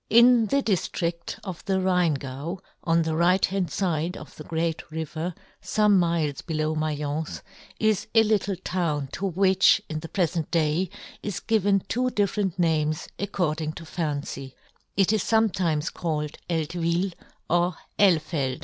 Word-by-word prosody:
N 235 0 +6
the 280 +5 +1
diftria 170 -3 -1
of 185 -4 -6
the 190 -1 +1
Rhein 180 -4 +2
gau, 140 +6 -5 0.3
on 165 0 +3
the 160 0 -1
right 180 +3 +4
hand 185 -4 -2
fide 175 -2 -1
of 155 - -11
the 155 - -9
great 165 +1 -2
river, 160 +2 -4 0.3
fome 210 -1 +3
miles 165 -5 +1
below 155 -2 -1
Maience, 155 0 -2 0.4
is 215 -2 +1
a 225 - +8
little 205 -2 +1
town 165 -6 -2
to 195 - -2
which, 190 +1 +4
in 155 -1 -3
the 165 - -8
prefent 170 -4 0
day, 165 +2 +1 0.3
is 205 -4 -3
given 205 -3 +2
two 255 +2 +1
different 200 -4 0
names, 155 -3 +1
ac 200 - -1
cording 155 -5 -1
to 165 - -9
fancy; 145 -5 -4 0.4
it 195 +1 +4
is 215 - +1
fometimes 185 -9 +1
called 150 -3 -2
Eltvil 170 +3 0 0.3
or 175 +1 +2 0.2
Elfeld. 155 -8 +2
170 Hz, 150 wpm, -26 LUFS, 155-195 Hz, 0.4 s, a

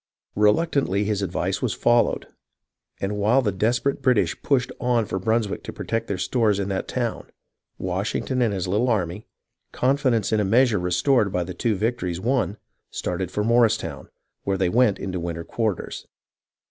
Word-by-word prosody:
Reluctantly 105 - +2
his 105 -1 -1
advice 100 - -2
was - - -1
followed, 120 0 +2 0.7
and 105 +1 -2
while 115 +6 +3
the 105 - +1
desperate 115 +8 0
British 125 -4 +2
pushed 130 -3 +1
on 120 -2 +1
for 95 - -3
Brunswick 110 +1 0
to - - -5
protect 115 0 -3
their 100 - -2
stores 105 +2 +1
in 100 0 -2
that 95 -1 -2
town, 120 -3 -3 0.5
Washington 100 +7 -2
and 115 -3 +2
his 95 -2 -2
little 105 +7 +1
army, 100 -2 -1 0.4
confidence 130 -5 +1
in 110 - +2
a - - +2
measure 115 +1 +3
restored 100 +5 +2
by 90 -1 0
the 90 +1 -6
two 115 +1 0
victories 95 -5 -2
won, 110 -3 0 0.3
started 90 0 -3
for 105 - -2
Morristown, 115 0 +1 0.3
where 100 -1 0
they 95 -1 +1
went 115 -1 +3
into 95 -2 -4
winter 85 -1 -4
quarters. 110 +2 -3
105 Hz, 160 wpm, -24 LUFS, 95-120 Hz, 0.7 s, while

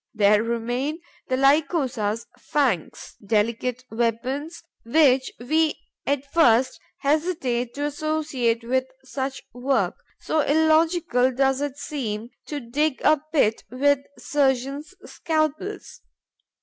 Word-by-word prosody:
There 210 0 +4
remain 240 +7 -2 0.3
the 255 - 0
Lycosa's 270 -6 +1
fangs, 255 - -2
delicate 230 +4 0
weapons 250 +8 -2 0.2
which 260 +1 +3
we 310 +5 +1 0.3
at 280 0 0
first 255 -5 +4 0.2
hesitate 275 -6 0
to 290 +1 -2
associate 290 -6 -1
with 260 +2 0 0.2
such 265 0 -4
work, 260 +2 0 0.3
so 315 - -1
illogical 315 -3 +3
does 270 +1 +1
it 290 -1 -3
seem 240 -6 -4 0.2
to 295 - -4
dig 280 +4 -1
a 305 -2 +4
pit 225 -8 +2
with 280 +3 +2 0.2
surgeon's 275 +3 -1
scalpels. 315 +6 -2
270 Hz, 105 wpm, -24 LUFS, 240-300 Hz, 0.3 s, There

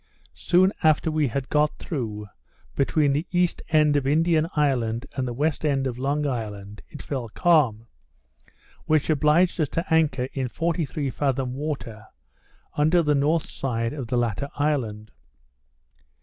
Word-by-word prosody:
Soon 185 +3 +3
after 155 0 +3
we 155 -2 +1
had 130 +2 -3
got 150 0 +1
through, 110 - -5 0.5
between 145 +1 +2
the 150 +5 -2
east 180 -1 +1
end 150 -2 +3
of 140 -2 +1
Indian 160 +2 +2
Island 125 -5 0
and 130 -2 -2
the - - -3
west 150 +5 -1
end 140 -3 +1
of 125 -2 -3
Long 145 +3 0
Island, 105 -6 -5
it 150 - -10
fell 130 -5 -4
calm, 130 -7 +2 1.0
which 155 0 +2
obliged 155 +4 +3
us 150 - 0
to 165 - -2
anchor 150 -6 +2
in 130 -2 -2
forty 165 +5 -1
three 140 -1 -3
fathom 135 -2 -1
water, 130 -7 -5 0.7
under 160 +4 +3
the 150 -1 +2
north 150 +3 +1
side 115 -2 -3
of 135 -5 -5
the 125 +1 -1
latter 120 +3 -1
island. 120 -8 -2
145 Hz, 150 wpm, -24 LUFS, 125-155 Hz, 1.0 s, Soon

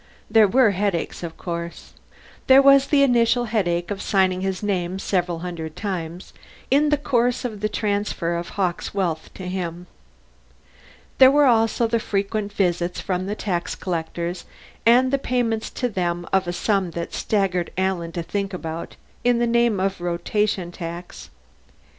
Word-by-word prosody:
There 220 -1 +6
were 230 +1 +4
headaches, 195 -3 -2
of 170 -2 -6
course. 170 -1 -6 0.5
There 265 +1 +8
was 275 0 +6
the 280 -1 +4
initial 240 -2 +3
headache 175 -5 -1
of 200 -1 -3
signing 185 -2 +1
his 190 0 -2
name 185 -3 -1
several 175 -3 -1
hundred 160 -3 -6
times 180 -3 -5 0.4
in 295 +2 +4
the 295 - +3
course 245 -3 0
of 215 -4 -4
the 215 +1 -1
transfer 205 -5 -1
of 170 0 -4
Hawkes' 185 0 -2
wealth 170 -5 -2
to 185 - -7
him. 180 -1 -4 1.3
There 260 -1 +9
were 290 +1 +4
also 230 -1 +3
the 230 0 +1
frequent 205 0 -2
visits 180 -3 0
from 185 -1 -2
the 205 - -2
tax 180 -5 -2
collectors, 170 0 -4 0.4
and 250 +2 +5
the 275 - +3
payment 240 -4 0
to 250 - 0
them 175 -5 -2
of 190 -2 +2
a - - 0
sum 195 0 0
that 170 - -4
staggered 190 -4 0
Alan 185 -3 -1
to 170 - -3
think 195 +2 -3
about, 165 -1 -6 0.3
in 245 -1 +3
the 240 - +2
name 235 -3 +2
of 195 -1 -1
Rotation 175 +1 -1
Tax. 170 0 -8
195 Hz, 160 wpm, -23 LUFS, 175-225 Hz, 1.3 s, There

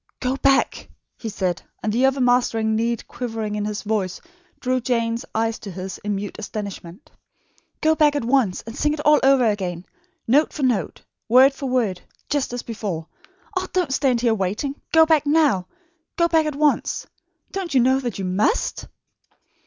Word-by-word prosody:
"Go 255 +1 -1
back!" 275 0 +2 0.3
he 225 - -6
said, 185 -4 -2 0.2
and 215 - 0
the 250 +4 +4
overmastering 245 -4 +2
need 230 +1 -1
quivering 225 -4 -4
in 210 0 -2
his 210 -1 -4
voice 205 -4 -1 0.4
drew 255 0 0
Jane's 230 -1 -1
eyes 225 0 0
to 205 - -8
his 190 +1 -6
in 205 0 -2
mute 200 +1 -5
astonishment. 200 -4 -7 0.7
"Go 315 0 +4
back 300 -2 +3
at 285 - -1
once 240 -7 +1
and 225 +1 -9
sing 300 0 +1
it 305 - -5
all 300 0 +6
over 270 -2 +4
again, 185 -5 -1 0.4
note 285 +7 +3
for 295 - -4
note, 245 -6 0 0.3
word 260 +4 +7
for 270 -1 -5
word, 225 -8 0 0.3
just 290 -4 0
as 245 0 -4
before. 205 -8 -4 0.5
Ah, - - -1
don't 355 -7 0
stand 255 -4 +2
here 235 -2 +3
waiting! 210 +7 -2 0.2
Go 320 0 +7
back 315 -2 +2
now! 290 - +3 0.5
Go 340 - +4
back 320 -2 +2
at 300 - -3
once! 295 0 +1 0.5
Don't 370 -7 -4
you - - +6
know 260 +2 +3
that 245 -3 -4
you 195 - -3
MUST?" 195 - 0
240 Hz, 175 wpm, -22 LUFS, 210-275 Hz, 0.7 s, word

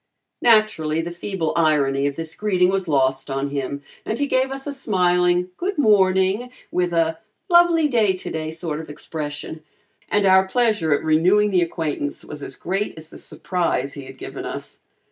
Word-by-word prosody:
Naturally 215 -9 +3
the 170 +1 -5
feeble 175 -2 -3
irony 140 -4 +2
of 140 - -3
this 165 +1 -4
greeting 185 -2 +2
was 190 -1 -1
lost 135 -2 +1
on 135 +1 -2
him 140 0 -4 0.2
and 220 - -3
he 285 - +1
gave 260 -1 +1
us 270 0 -6
a 290 - -4
smiling 180 -6 +1
"good 390 +1 -3
morning," 195 -1 +3 0.2
with 180 -1 0
a 165 -1 +1 0.3
"lovely 345 -2 +5
day 225 -8 +2
today" 160 -4 -5
sort 160 -1 -4
of 160 - -9
expression, 150 +1 -6 0.5
and 205 -1 +2
our 190 0 +5
pleasure 215 -7 +1
at 145 - +2
renewing 180 +7 +3
the 180 -2 +3
acquaintance 155 -4 -3
was 150 -1 -8
as - - -5
great 195 +4 -3
as 160 0 -10
the - - -12
surprise 170 -7 -2
he 140 -2 -8
had 135 0 -11
given - - -7
us. - - -7
175 Hz, 175 wpm, -22 LUFS, 155-210 Hz, 0.5 s, lovely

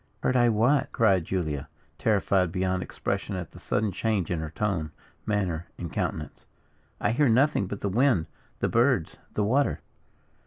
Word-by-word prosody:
"Heard 130 - +2
I 120 -1 +5
what?" 130 +6 +2
cried 95 -7 +3
Julia, 80 -7 -2 0.3
terrified 95 -4 +2
beyond 95 0 0
expression 100 - -3
at 90 -4 -5
the - - -13
sudden 105 -2 0
change 100 -3 -1
in 85 - 0
her 80 -1 -4
tone, 85 -3 -1 0.4
manner, 90 -6 -1
and 85 -3 -6
countenance; 75 -1 -3 0.6
"I - - +1
hear 135 +3 +3
nothing 125 -3 +3
but 100 +1 -6
the - - -1
wind, 115 - +3 0.4
the - - +2
birds, 120 - +2 0.2
the 105 - +1
water!" 130 +7 +1
100 Hz, 160 wpm, -27 LUFS, 90-115 Hz, 0.6 s, I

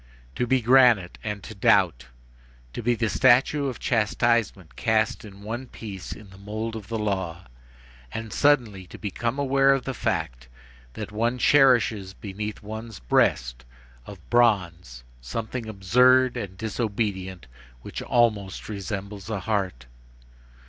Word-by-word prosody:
To 125 - -1
be 130 +1 +2
granite 120 -7 +4
and 105 -3 -4
to - - -8
doubt! 60 - +2 0.7
to - - -5
be 120 +1 +1
the 115 0 0
statue 130 +5 +3
of 130 - -4
Chastisement 110 -4 0
cast 110 +1 0
in 100 -2 -12
one 120 +5 -5
piece 100 -6 -8
in 105 -3 -10
the 95 - -15
mould 110 +3 -5
of 105 -3 -8
the 115 - -3
law, 95 -5 -3 0.7
and 110 -1 -6
suddenly 120 -10 +2
to - - -11
become 115 +5 -3
aware 135 0 +3
of 135 - -3
the 135 - -4
fact - - -3 0.5
that 100 - -7
one 115 +4 0
cherishes 120 -8 +3
beneath 105 +1 -6
one's 110 0 -7
breast - - +1 0.4
of 95 -6 -12
bronze 90 - +1 0.2
something 110 - -5
absurd 125 +6 +4
and 100 -6 -6
disobedient 100 - -3 0.4
which - - -6
almost 105 -6 0
resembles 100 -1 -6
a 105 -3 -3
heart! 95 - -2
110 Hz, 135 wpm, -25 LUFS, 95-120 Hz, 0.7 s, granite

